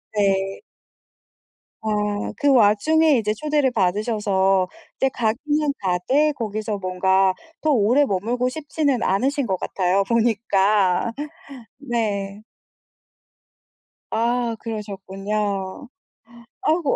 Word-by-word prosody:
네. 195 -1 +1 1.2
아 210 -1 -1
그 285 - +2
와중에 265 +7 +4
이제 210 -2 0
초대를 295 +1 +1
받으셔서 195 -2 +1 0.3
이제 270 - +2
가기는 285 +6 0
가되 200 +12 +1
거기서 215 -4 -3
뭔가 190 0 +2 0.3
더 310 - +1
오래 250 +2 +4
머물고 240 +4 -1
싶지는 290 -2 -1
않으신 265 +8 +1
것 190 -3 0
같아요 185 +2 0
보니까. 215 -3 +2 0.7
네. 210 -6 -3 1.7
아 235 +1 0
그러셨군요. 200 0 -4 0.7
아이고 315 -3 +1
215 Hz, 200 characters per minute, -22 LUFS, 195-255 Hz, 1.7 s, 와중에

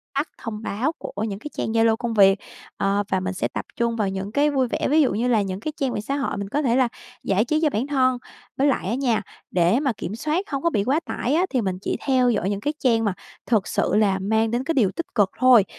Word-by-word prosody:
tắt 285 +3 0
thông 220 -2 -6
báo 240 +10 -1
của 205 - -5
những 205 -3 -3
cái 300 - -7
trang - - -2
Zalo 225 0 +3
công 240 -2 -3
việc, 195 -2 +5 0.4
ờ, 200 +1 +1
và 190 - +2
mình 190 +1 -3
sẽ 185 - -1
tập - - -5
trung 235 -1 0
vào 210 -4 0
những 195 +1 -4
cái 290 +4 +3
vui 265 -3 +1
vẻ, - - -1
ví 310 +3 +5
dụ 265 - +2
như 230 +5 0
là 230 -4 +3
những 190 -1 -3
cái 305 +6 -4
trang 270 -3 -1
về - - -2
xã 275 +6 -3
hội 275 -7 -2
mình 200 0 -4
có 290 +5 0
thể 245 -4 +2
là 255 -2 +4 0.4
giải 200 +4 +2
trí 305 +4 +1
cho 305 - +4
bản 255 +2 -2
thân. 255 -3 +2 0.4
Với 275 +2 +3
lại 250 -9 0
á 230 - 0
nha, 245 -6 +1 0.3
để 180 +7 +3
mà 280 -3 +1
kiểm 205 - -5
soát 310 - -2
hông 275 +1 -2
có 335 - +3
bị 205 -10 0
quá 275 +7 +2
tải 260 - -2
á, 360 +3 +3
thì 255 -4 0
mình 190 -3 -2
chỉ - - -2
theo 255 -3 +3
dõi 200 -4 0
những 200 -1 -2
cái 295 - -1
trang 230 -3 +2
mà 200 - +1 0.3
thực 220 -5 +1
sự - - 0
là 200 -3 +3
mang 220 +3 +1
đến 240 +2 0
cái 330 +4 -1
điều 220 -9 +3
tích 335 - -6
cực 205 -4 +3
thôi, 250 -5 +6
230 Hz, 275 wpm, -23 LUFS, 200-270 Hz, 0.4 s, thôi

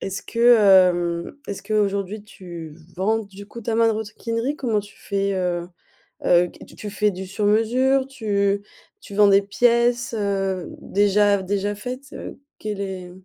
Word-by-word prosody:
est-ce 195 0 -4
que 240 +1 +5 0.3
hem, 170 +5 -3
est-ce 200 - -6
qu'aujourd'hui 205 -1 -1
tu 170 -6 -10 0.2
vends 215 +4 +1
du 200 -2 -10
coup 235 +2 -10
ta 225 0 -2
maroquinerie? 230 +3 -1
Comment 230 -7 0
tu 205 0 -15
fais, 200 -1 -1
heu 175 -2 -2 0.6
heu, 175 0 +5
qu - - -15
tu 210 - -6
fais 210 +1 +1
du 190 0 -7
sur 205 +2 -2
mesure? 255 +5 +2
Tu 205 -6 0 0.4
tu 200 - -11
vends 205 0 +6
des 195 0 +6
pièces, 240 +4 +2
heu, 195 -3 -1
déjà 205 0 +3
déjà 205 +2 -1
faites, 255 +6 -7
heu, - - -8 0.2
quel 210 -2 -4
est 185 -2 -6
205 Hz, 155 wpm, -22 LUFS, 195-225 Hz, 0.6 s, vends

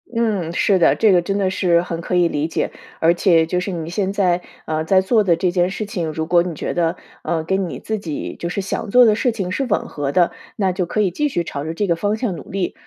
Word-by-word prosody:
嗯， 210 -8 0
是 190 +2 +2
的， 170 - +4
这 220 -2 +4
个 180 -2 +4
真 195 +3 -2
的 190 -2 +1
是 175 -3 +2
很 170 -2 -5
可 180 - -2
以 175 -1 +4
理 150 -1 -1
解。 165 - -2 0.3
而 165 +1 +4
且 170 -2 +3
就 180 +2 -1
是 180 +2 -3
你 165 -2 -4
现 190 +1 -1
在， 180 -3 +1 0.2
呃， 155 0 -1
在 185 +3 +4
做 215 +3 +2
的 175 -4 +3
这 175 +2 0
件 175 0 +2
事 210 +3 -4
情， 175 -6 -3
如 160 +1 -3
果 175 +1 +4
你 170 -2 -4
觉 - - -3
得， 170 0 0 0.3
呃， 160 0 -1
跟 190 +1 -1
你 - - -6
自 220 -1 -3
己， 155 -7 -5
就 170 - -3
是 190 - -3
想 200 +3 -4
做 245 +3 +7
的 215 - +5
事 235 +3 +1
情 195 -5 -4
是 270 +8 -1
吻 215 -5 -1
合 145 -2 -3
的， 175 +3 +3 0.2
那 195 -3 +1
就 180 0 -1
可 215 - 0
以 195 -3 +1
继 295 - 0
续 175 -10 -1
朝 140 -3 -5
着 160 +2 -4
这 205 - 0
个 170 -3 +1
方 205 +5 0
向 220 -6 -2
努 - - -10
力。 190 -2 -2
180 Hz, 295 characters per minute, -20 LUFS, 170-200 Hz, 0.3 s, 做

